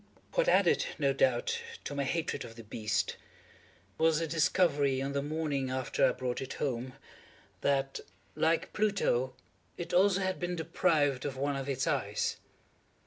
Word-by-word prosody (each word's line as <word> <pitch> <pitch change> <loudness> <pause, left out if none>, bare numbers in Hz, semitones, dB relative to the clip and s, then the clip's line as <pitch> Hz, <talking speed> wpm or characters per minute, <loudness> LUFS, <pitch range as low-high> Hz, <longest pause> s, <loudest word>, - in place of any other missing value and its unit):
What - - +2
added, - - +4
no - - +2
doubt, 470 -1 +1 0.2
to - - -5
my 140 -1 -1
hatred 165 +4 -1
of 115 - -10
the 115 - -10
beast, 105 -1 -1 0.8
was 160 -1 +4
the 165 - 0
discovery, 155 -4 +2
on 135 +1 -2
the 140 - 0
morning 145 -3 -1
after 130 0 -1
I - - +6
brought 125 0 -3
it 135 - -5
home, 130 -2 -2 0.7
that, 135 -1 +1 0.3
like 165 +1 +1
Pluto, 195 - +1 0.4
it 175 0 -5
also 195 +2 +4
had 185 -1 -1
been 175 0 -2
deprived 145 -4 +1
of 140 -2 -4
one 140 +1 0
of 135 0 -4
its 130 -1 0
eyes. 130 -10 0
140 Hz, 155 wpm, -31 LUFS, 130-165 Hz, 0.8 s, I